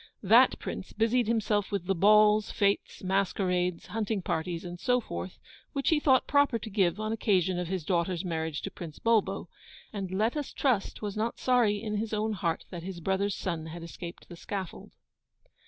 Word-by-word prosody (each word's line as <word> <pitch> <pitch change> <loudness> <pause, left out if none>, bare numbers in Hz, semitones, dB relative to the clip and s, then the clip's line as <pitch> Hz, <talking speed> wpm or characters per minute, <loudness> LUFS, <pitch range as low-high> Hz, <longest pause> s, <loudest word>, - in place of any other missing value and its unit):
That - - +6
Prince - - -6
busied 230 +1 +2
himself 215 -3 +1
with 200 -4 -2
the 195 - +1
balls, 210 +3 +5
fetes, 200 -1 0
masquerades, 180 -2 0
hunting 215 -3 -2
parties, 170 +1 -2
and 175 0 -7
so 250 +6 +2
forth, 90 - -6 0.4
which 275 -1 0
he 320 - +3
thought 265 -4 +4
proper 285 -4 +3
to 220 0 -7
give 190 -2 +2
on 215 0 -2
occasion 190 -5 +1
of 180 - -3
his 180 -3 -3
daughter's 175 0 0
marriage 160 -3 -3
to - - -4
Prince 160 -4 -9
Bulbo; 230 -2 +1 0.5
and 195 -3 -4
let 215 +7 0
us 295 -2 -4
trust 235 -6 0
was 205 -2 -3
not 220 +2 -1
sorry 240 -5 +2
in 210 -1 -3
his 220 +1 -2
own 215 +1 0
heart 170 -5 -2
that 175 -3 -6
his 180 0 -6
brother's 190 +3 0
son 165 -3 -3
had 165 +1 -8
escaped 170 +1 -9
the 175 - -10
scaffold. 190 +1 -6
200 Hz, 185 wpm, -29 LUFS, 175-220 Hz, 0.5 s, That